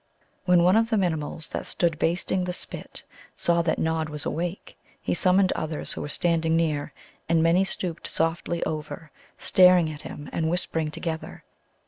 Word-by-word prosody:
When 180 -2 +5
one 180 +3 +5
of 225 0 +2
the 225 - +2
Minimuls 160 -3 -1
that - - -4
stood 170 -3 0
basting 180 +2 0
the 180 - -2
spit - - -5 0.3
saw 170 0 +2
that 165 -1 0
Nod 160 -1 -1
was 150 -1 -6
awake 175 +4 -4 0.2
he - - -2
summoned 185 0 +4
others 155 -1 -3
who - - -6
were 145 - -5
standing 165 0 +1
near, 155 -3 0 0.4
and 165 -1 +3
many 170 +3 +4
stooped 180 -3 -3
softly 165 +1 -1
over, 155 +1 -5 0.3
staring 180 -3 +5
at 150 -1 -9
him, 145 - -8
and 160 -1 0
whispering 165 -2 -1
together. 160 +1 -5
165 Hz, 165 wpm, -25 LUFS, 160-180 Hz, 0.4 s, When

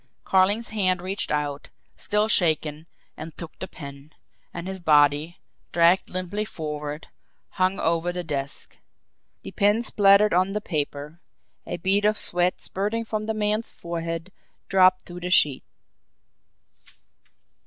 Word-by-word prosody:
Carling's 200 +5 +2
hand 190 -4 +1
reached 190 +3 -3
out, 145 -1 -2 0.3
still 210 +1 0
shaking, 160 -5 +2 0.3
and 160 0 -9
took 170 -2 -9
the 190 - -5
pen; 140 -2 -11 0.4
and 170 +1 -7
his 190 0 -5
body, 150 0 +3 0.3
dragged 170 +2 +3
limply 185 +3 -3
forward, 150 -5 -6 0.4
hung 185 +1 0
over 165 +1 0
the 180 0 -4
desk. 140 -3 -6 0.6
The - - -8
pen 210 +2 +2
spluttered 205 -2 +4
on 185 +2 +2
the 210 - -1
paper 150 -2 -4 0.5
a - - -4
bead 195 +4 +1
of 210 0 +3
sweat 180 +1 +2
spurting 210 +4 -2
from 215 -1 -3
the 220 - -1
man's 215 +1 -1
forehead 170 +1 -5 0.4
dropped 185 -1 +4
to 175 0 -8
the 180 0 -4
sheet. 150 -7 +3
180 Hz, 130 wpm, -24 LUFS, 155-200 Hz, 0.6 s, spluttered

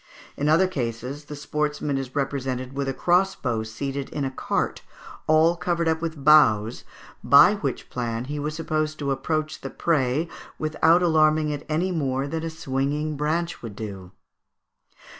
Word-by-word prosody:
In 145 +1 0
other 165 +5 +5
cases 130 -1 -4
the 150 - -7
sportsman 150 0 -2
is 135 -1 -4
represented 135 -2 -2
with 140 0 -2
a - - +1
crossbow 175 -10 +1
seated 135 +5 -4
in 145 -2 -3
a 135 - -2
cart, - - -2 0.5
all 160 +2 +5
covered 170 0 -1
up 160 0 +1
with 160 -4 -4
boughs, 120 -8 +5 0.4
by - - +7
which - - -3
plan 120 -1 -3
he 145 +2 -4
was 150 +1 -3
supposed 155 -1 -2
to 140 -2 -2
approach 155 +3 -2
the - - -5
prey 150 -1 0 0.3
without 160 +3 +3
alarming 155 -2 +3
it 145 -1 -5
any 170 +5 0
more 135 -5 -1
than 160 +2 -3
a 165 - -2
swinging 150 0 -2
branch 160 +4 -1
would 115 -4 -8
do 100 -4 -7 0.8
(Fig. - - -28
150 Hz, 160 wpm, -24 LUFS, 135-155 Hz, 0.8 s, by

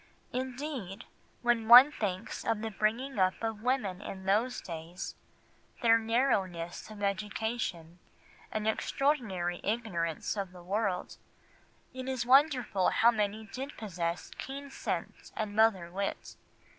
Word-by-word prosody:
Indeed, 255 - -4 0.4
when 240 -2 +2
one 250 +5 +11
thinks 200 -5 -3
of 225 -2 0
the 225 - -3
bringing 225 +5 -1
up 185 0 +3
of 220 -2 -2
women 220 -7 0
in 190 -2 -7
those 220 +6 +2
days, 170 +1 -6 0.7
their 230 -1 +6
narrowness 205 -9 0
of 210 -1 -8
education 200 -4 -2 0.5
and 215 0 -2
extraordinary 220 - 0
ignorance 195 -8 -1
of 195 -3 -4
the 180 -1 -12
world, 195 -1 -1 0.8
it 260 0 -5
is 255 -2 -1
wonderful 255 -7 +4
how 235 +1 +5
many 215 -1 -1
did 265 +7 -7
possess 175 -5 -3
keen 280 +1 -6
sense - - -4
and 210 -1 -3
mother 205 -6 +3
wit. 195 +2 -4
215 Hz, 125 wpm, -31 LUFS, 190-240 Hz, 0.8 s, one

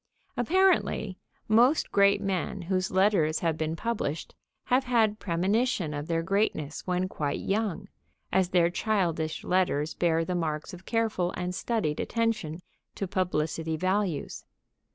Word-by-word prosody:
Apparently, 345 - +2 0.3
most 240 +7 +4
great 200 0 +4
men 190 -1 -2
whose 185 +1 0
letters 190 -5 +2
have 165 -2 +1
been 160 0 -2
published 185 -7 -3 0.3
have 255 +2 +2
had 220 -4 +2
premonition 190 0 0
of 145 +1 -4
their 165 -1 0
greatness 165 -6 -1
when 180 0 0
quite 145 -5 -2
young, 205 -2 -1 0.4
as 190 -2 +2
their 175 -2 +3
childish 175 -7 -1
letters 175 -5 +1
bear 165 -1 +1
the 180 - -2
marks 155 -3 -2
of 180 +1 -11
careful 220 -6 0
and 180 0 -3
studied 185 -7 -1
attention 220 -8 -1 0.3
to 195 - -3
publicity 160 -3 -1
values. 185 -2 -1
185 Hz, 135 wpm, -28 LUFS, 160-215 Hz, 0.4 s, most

